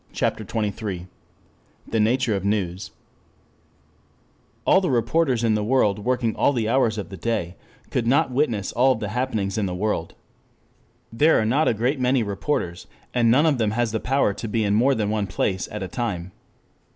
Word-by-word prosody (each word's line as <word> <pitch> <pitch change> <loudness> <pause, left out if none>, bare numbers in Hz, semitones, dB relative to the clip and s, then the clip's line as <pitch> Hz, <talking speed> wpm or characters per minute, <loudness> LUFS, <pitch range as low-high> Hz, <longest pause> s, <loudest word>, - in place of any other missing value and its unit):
CHAPTER 110 - -1
XXIII 105 -3 -3 0.8
THE 115 - -1
NATURE 115 +1 +2
OF 95 - -3
NEWS 100 -3 -2 1.7
1 - - +3
ALL 190 - +6
the 180 - 0
reporters 125 +1 +1
in 115 -2 +3
the 105 -1 0
world 105 -4 +2
working 120 0 0
all 140 - +2
the 115 -4 -1
hours 115 -2 +2
of 100 -5 -5
the 95 - -8
day 90 -3 -2 0.4
could 115 -2 -1
not 130 +1 +3
witness 120 -7 0
all 130 +3 +3
the 105 -3 -4
happenings 110 -4 -2
in 100 - 0
the 90 - -4
world. 95 -4 -2 1.0
There 150 +7 +4
are 110 - +1
not 140 +8 +2
a 115 - +2
great 125 +6 0
many 125 -1 +2
reporters. 100 -4 -3 0.3
And 120 -2 +3
none 135 +7 +4
of 145 -6 +2
them 110 -2 +1
has 120 -2 +1
the 110 - -1
power 135 -4 +1
to 115 - -6
be 110 +1 0
in 100 -1 +1
more 130 +6 +3
than 105 -1 -1
one 105 -2 -1
place 95 +1 -1
at 105 -2 -4
a - - -4
time. 95 -3 -4
110 Hz, 190 wpm, -23 LUFS, 100-125 Hz, 1.7 s, ALL